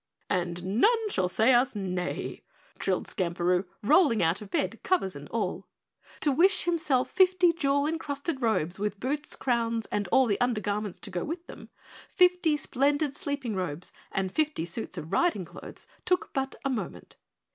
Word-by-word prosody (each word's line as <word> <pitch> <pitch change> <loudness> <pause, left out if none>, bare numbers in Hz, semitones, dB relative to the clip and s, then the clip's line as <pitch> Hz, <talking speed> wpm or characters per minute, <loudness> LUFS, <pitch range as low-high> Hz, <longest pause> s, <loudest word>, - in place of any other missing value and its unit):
"And 180 +3 -1
none 450 -1 +4
shall 180 - +1
say 225 +7 +4
us 245 0 +3
nay," 180 -3 -3 0.4
trilled - - 0
Skamperoo, 180 0 0 0.2
rolling 285 - +4
out 165 +5 +1
of 210 - -9
bed, 190 +3 -1
covers 350 - 0
and 145 0 -9
all. 230 - -3 0.5
To 290 - +4
wish 370 +7 +4
himself 315 -7 +1
fifty 370 -2 +4
jewel 285 -3 +1
encrusted 300 -2 -3
robes 195 -6 +1
with 210 -1 -2
boots, 290 +5 -1
crowns, 230 -3 0
and 205 -2 -1
all 265 +8 +4
the 215 0 -1
undergarments 210 -4 -1
to - - -4
go 175 -1 -2
with 335 +3 -5
them, - - -11 0.4
fifty 360 -4 +3
splendid 285 +1 0
sleeping 285 - -3
robes, 180 -3 -3 0.2
and 190 -1 -1
fifty 305 - 0
suits 175 +6 -4
of 155 - -6
riding 270 - +2
clothes - - -11 0.2
took 365 0 0
but 270 0 -2
a - - +2
moment. 240 - -5
245 Hz, 160 wpm, -28 LUFS, 190-305 Hz, 0.5 s, none